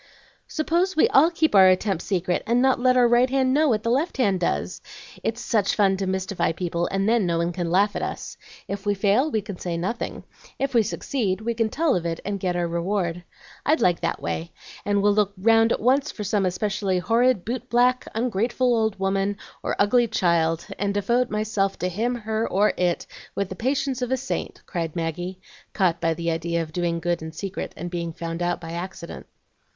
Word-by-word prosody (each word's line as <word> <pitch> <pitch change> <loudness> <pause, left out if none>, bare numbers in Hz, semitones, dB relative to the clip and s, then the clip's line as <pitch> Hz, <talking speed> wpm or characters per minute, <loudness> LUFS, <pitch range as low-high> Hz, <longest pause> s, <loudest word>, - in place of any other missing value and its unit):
"Suppose 340 +4 0
we 310 - +5
all 305 +5 +6
keep 325 -2 +1
our 190 -2 +8
attempts 185 -1 +1
secret, 180 -2 0
and 235 +2 +3
not 260 0 +3
let 255 0 +3
our 245 -1 +6
right 240 +2 +4
hand 260 -1 +2
know 305 +1 +3
what 215 -3 +1
the 230 - 0
left 290 +7 0
hand 200 -8 +2
does? 170 - -2 0.4
It's 230 +1 -2
such 215 -4 +1
fun 195 -2 +3
to 190 0 -2
mystify 190 -2 -1
people, 170 0 -2
and 195 +1 -1
then 225 -4 +3
no 170 -1 +1
one 170 +1 0
can 175 -1 -2
laugh 200 +4 +2
at - - -2
us. - - -5 0.3
If 200 0 -5
we 205 -1 +1
fail, 205 +9 +2
we 220 -7 -1
can 200 -4 -7
say 170 -2 -3
nothing; 190 +8 -3 0.3
if 275 0 -2
we 235 - +5
succeed, 210 -2 -2
we 235 +2 -1
can 225 -1 0
tell 315 +3 +1
of 175 - -1
it 165 0 -3
and 200 0 -2
get 180 -1 -1
our 175 -1 0
reward. 175 0 -2 0.4
I'd 310 +3 +2
like 175 -1 +2
that - - -1
way, 165 +1 -4 0.3
and 205 -1 +1
will 205 0 +4
look 205 -1 +1
round 225 +3 +4
at - - +1
once 270 +5 +2
for 210 - -6
some 200 -1 +1
especially 195 0 -1
horrid 230 +2 +2
boot 250 +2 -4
black, 250 +1 +2
ungrateful 240 +2 +1
old 220 -2 0
woman, 195 +1 0 0.2
or - - -2
ugly 235 +4 +3
child, 170 -5 +1
and 200 0 -1
devote 240 +5 +1
myself 210 -2 -1
to 180 - -1
him, 230 +7 -1
her, 220 -1 -2
or 205 +3 +3
it 175 -1 0 0.3
with 200 -2 -1
the 190 - -6
patience 260 +3 -1
of 250 0 -2
a 260 - +2
saint," 270 - -4
cried 165 -5 -4
Maggie, 175 +3 -3 0.3
caught 180 -4 +1
by 165 -1 +1
the 170 0 -1
idea 165 +1 -1
of 155 -1 -11
doing 170 -1 -1
good 175 0 -1
in 160 0 -6
secret 190 +4 -5
and 175 +2 -5
being 170 -1 -3
found 165 +1 -5
out 175 0 0
by 165 -1 -8
accident. 170 0 -7
200 Hz, 210 wpm, -24 LUFS, 175-235 Hz, 0.4 s, our